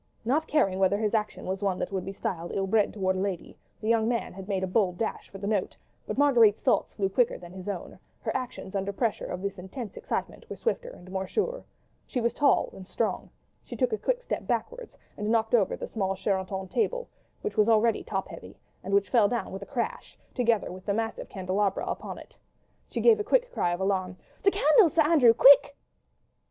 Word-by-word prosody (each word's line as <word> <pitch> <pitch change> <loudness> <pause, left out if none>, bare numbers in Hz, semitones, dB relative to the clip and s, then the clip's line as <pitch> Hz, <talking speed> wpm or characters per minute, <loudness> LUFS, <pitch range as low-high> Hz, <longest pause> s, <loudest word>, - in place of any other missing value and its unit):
." - - -37
Not 300 +7 +1
caring 195 -12 +2
whether 195 +1 +3
his 215 0 -1
action 215 -1 -1
was 190 +1 -3
one 195 -2 0
that - - -3
would 190 -2 -2
be 195 - -4
styled 175 -3 -4
ill 195 - 0
bred 210 +1 +2
towards 190 -2 -1
a - - -1
lady, 195 -3 -4 0.2
the 215 - -5
young 225 -1 +3
man 235 -1 -1
had 190 0 -9
made 195 -2 -1
a - - 0
bold 185 -2 +1
dash 225 - -3
for 195 - -9
the 195 - -6
note; 205 -2 -1 0.3
but - - -3
Marguerite's 240 -7 +5
thoughts 255 - +1
flew 195 -2 +1
quicker 235 +5 +1
than 175 -1 -12
his 185 +1 -7
own; 190 -4 -6 0.2
her - - -3
actions, 250 -7 -5
under 195 0 -1
pressure 220 0 -1
of 180 +1 -5
this 200 -1 -3
intense 195 +4 -7
excitement, - - -4
were - - -5
swifter 480 +1 -2
and 185 - -13
more 190 0 -3
sure. - - -2 0.4
She 255 - -2
was 235 0 0
tall 290 - +3
and 185 -1 -11
strong; 225 - -2 0.3
she - - -8
took 475 - 0
a - - +1
quick - - -1
step - - -4
backwards - - -3 0.2
and 210 +1 -2
knocked 225 0 +1
over 215 -5 +3
the - - -5
small 195 -3 -2
Sheraton 190 -1 -2
table 485 - -1 0.4
which 425 - -3
was 215 +1 +3
already 225 0 +3
top 195 -2 -3
heavy, - - -11 0.3
and 195 +2 0
which 200 0 +2
fell 230 -5 +5
down 240 -1 -2
with 195 - -6
a 200 - -8
crash, 245 -4 -4 0.2
together 235 -5 +1
with 185 +2 -11
the 200 - +1
massive 225 0 -3
candelabra 190 +1 -1
upon - - -5
it. - - -13 0.5
She - - -3
gave 450 -2 +6
a - - 0
quick - - +2
cry 175 - +1
of 175 - -2
alarm: 190 -1 -1 0.2
"The 395 - +5
candles, 315 0 +4
Sir 320 - +5
Andrew—quick!" 280 -2 +6
210 Hz, 220 wpm, -27 LUFS, 190-245 Hz, 0.5 s, gave